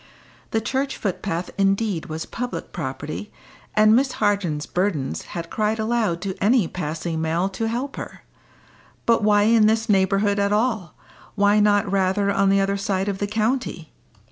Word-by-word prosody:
The 225 - 0
church 270 +4 -2
footpath 180 -3 -3
indeed 195 -3 +1
was 160 +1 -5
public 250 +1 -5
property, 155 +5 -5 0.4
and 215 +1 +6
Miss 265 +2 +2
Harden's 180 -8 0
burdens 175 -7 -1 0.2
had 170 0 -5
cried 215 0 0
aloud 220 -6 0
to 195 -1 -3
any 220 -3 +4
passing 160 -1 -4
male 165 +3 0
to 225 +3 -3
help 250 +5 -3
her. - - -8 0.8
But 230 -1 +3
why 205 -1 +4
in 220 0 +5
this 225 +1 +1
neighbourhood 200 +1 +2
at 200 0 +1
all? 215 -5 0 0.4
why 205 0 +4
not 205 -1 +3
rather 195 +1 +1
on 195 0 +2
the 195 0 +4
other 195 0 0
side 195 -1 -1
of 195 -1 -3
the 205 - -1
county? 215 - -2
200 Hz, 160 wpm, -23 LUFS, 185-220 Hz, 0.8 s, and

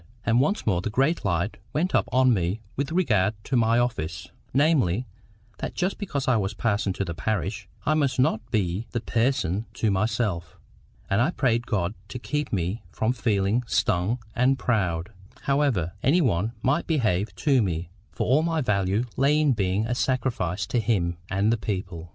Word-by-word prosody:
And 115 +1 +3
once 175 +11 +1
more 90 -5 +2
the 100 - -2
great 135 +9 +1
light 90 +1 -1 0.2
went 175 +5 0
up - - +2
on 130 -1 +4
me 95 +1 0 0.2
with 140 +3 -2
regard 110 - +2
to 135 - -2
my 115 -1 +3
office, 85 -8 -2 0.2
namely, 130 - +2 0.5
that - - -4
just 185 +2 -1
because 145 -9 -3
I 130 -3 +4
was 100 0 -2
parson 105 -2 0
to 100 - -2
the 85 - -4
parish, 105 +1 -2 0.2
I 155 - +3
must 140 -4 +1
not 125 -4 +2
be 100 0 -1
THE 120 - 0
PERSON 115 -4 0
to 110 - +1
myself. 100 -4 -1 0.5
And 100 +2 +2
I 130 - +3
prayed 120 -7 0
God 95 -4 0
to 125 - -6
keep 150 +4 -3
me 95 +3 -1
from 110 +6 0
feeling 110 -2 +1
STUNG 95 +3 +1 0.2
and 130 +2 +3
proud, 95 -8 0 0.3
however 135 - +1
any 150 +8 +4
one 110 - +1
might 145 +6 +1
behave 110 - 0
to 135 -5 +3
me; 85 -3 -2 0.2
for - - -2
all 135 +6 +4
my 165 0 0
value 100 -3 +1
lay 140 +3 +3
in 150 -2 +3
being 100 -2 0
a 120 - -1
sacrifice 115 -9 -1
to 120 - 0
Him 95 -7 0
and 100 +4 +2
the - - 0
people. 95 -5 -4
110 Hz, 180 wpm, -25 LUFS, 95-130 Hz, 0.5 s, on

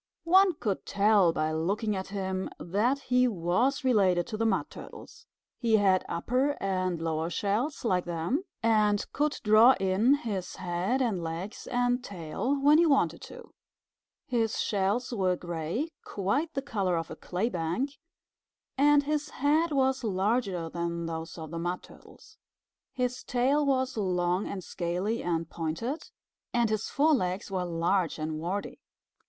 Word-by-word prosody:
One 375 +1 +5
could 205 -9 -2
tell 200 -3 +4
by 155 -1 -1
looking 200 +7 -1
at 190 0 -4
him 190 -1 -3
that 210 +10 +1
he 250 -1 +3
was 230 - 0
related 190 -9 +3
to - - -5
the 225 +1 +1
Mud 195 -4 0
Turtles. 455 0 -12 0.3
He 225 -3 +3
had 190 -3 +3
upper 255 +11 0
and 185 -3 -1
lower 160 0 -1
shells 215 - -1
like 185 -5 +1
them, 175 - -1 0.2
and 210 -2 +3
could 295 +1 0
draw 220 +4 +7
in 195 +8 +3
his 205 -9 -4
head 185 +8 -1
and 210 -8 -1
legs 165 +5 -5
and 245 0 +1
tail 200 - -3
when 295 +3 +5
he 340 - +5
wanted 275 -3 +2
to. - - -12 0.7
His 230 -3 0
shells 210 +5 0
were 185 -4 +1
gray, 175 - -3
quite 270 - -1
the 275 - -2
color 195 -10 0
of 165 0 -4
a - - -5
clay 185 +8 -2
bank, 175 - -2 0.9
and 290 0 +5
his 295 0 -1
head 305 +4 +1
was 265 -2 +1
larger 195 -3 0
than 170 0 -3
those 165 0 -5
of 160 -2 -7
the 165 - -4
Mud 175 +2 -3
Turtles. 440 0 -17 0.5
His 250 -2 -2
tail 265 +4 +2
was 260 -2 +1
long 180 -1 0
and 190 -2 -5
scaly 180 +8 -2
and 165 -2 -1
pointed, 165 - -4 0.5
and 235 -2 +2
his 215 0 -1
forelegs 215 - +1
were 185 -2 -1
large 170 +1 0
and 155 0 -3
warty. 185 +5 -4
205 Hz, 150 wpm, -29 LUFS, 175-255 Hz, 0.9 s, draw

